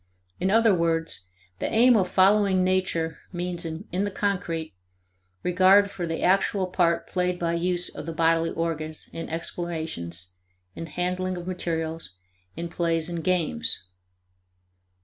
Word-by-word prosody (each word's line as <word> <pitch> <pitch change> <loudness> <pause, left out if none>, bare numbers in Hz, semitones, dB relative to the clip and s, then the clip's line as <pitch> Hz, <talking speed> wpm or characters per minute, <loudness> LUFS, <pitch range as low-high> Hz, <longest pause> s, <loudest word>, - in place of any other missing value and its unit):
In 185 - +1
other 225 +1 +5
words, 165 - 0 0.3
the - - -2
aim 240 +2 +6
of 190 -4 +2
following 190 0 +4
nature 180 -4 0
means, 175 -1 -3
in 165 +4 -5 0.2
the 205 - 0
concrete, 180 - -2 0.7
regard 190 +3 +5
for 175 -4 -4
the 165 0 -3
actual 195 +1 +2
part 175 -2 +1
played 180 -1 0
by 170 -1 -1
use 175 +1 +2
of - - -7
the - - -2
bodily 165 0 +2
organs 155 -2 -3
in 165 - -5
explorations, 160 - -4 0.4
in 165 - -7
handling 180 +2 -2
of 175 - -6
materials, 165 - -3 0.4
in 170 +1 -4
plays 165 -1 0
and 170 -2 -4
games. 155 - +1
175 Hz, 135 wpm, -26 LUFS, 165-185 Hz, 0.7 s, aim